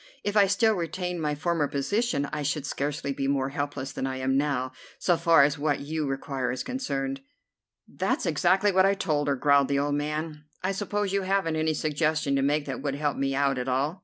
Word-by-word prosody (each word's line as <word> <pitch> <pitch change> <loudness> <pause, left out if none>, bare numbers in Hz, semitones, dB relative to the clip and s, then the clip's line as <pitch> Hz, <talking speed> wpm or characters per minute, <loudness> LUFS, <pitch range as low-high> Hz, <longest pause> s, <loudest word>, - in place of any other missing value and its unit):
If 205 0 -2
I 200 -2 +6
still 220 +3 +3
retained 180 -1 -3
my 150 -1 0
former 155 0 0
position 175 - 0
I 150 - -2
should 145 0 -1
scarcely 140 0 -2
be 135 0 -2
more 135 -1 +1
helpless 140 -1 -4
than 135 - -3
I 130 0 -3
am 130 0 0
now, 135 -2 0 0.3
so 175 - +2
far 165 -3 +5
as 145 +1 +1
what 145 -1 0
you 150 +1 -2
require 135 -1 -2
is 130 - -3
concerned." 140 - -3 0.7
"That's - - -1
exactly 190 +3 +3
what 190 0 +5
I 200 - +2
told 150 -7 0
her," 140 - +2
growled 140 +1 +4
the 140 - +1
old 145 +1 0
man. 150 +1 -3 0.2
"I 190 - +1
suppose 205 0 -2
you 200 - +2
haven't 190 -4 0
any 155 0 +1
suggestion 155 -1 0
to 135 - +2
make 145 +2 +1
that 135 -3 -5
would 140 -1 -2
help 145 0 -1
me 135 0 -1
out 140 -2 +1
at 125 - -3
all?" 140 +8 0
145 Hz, 215 wpm, -27 LUFS, 140-175 Hz, 0.7 s, I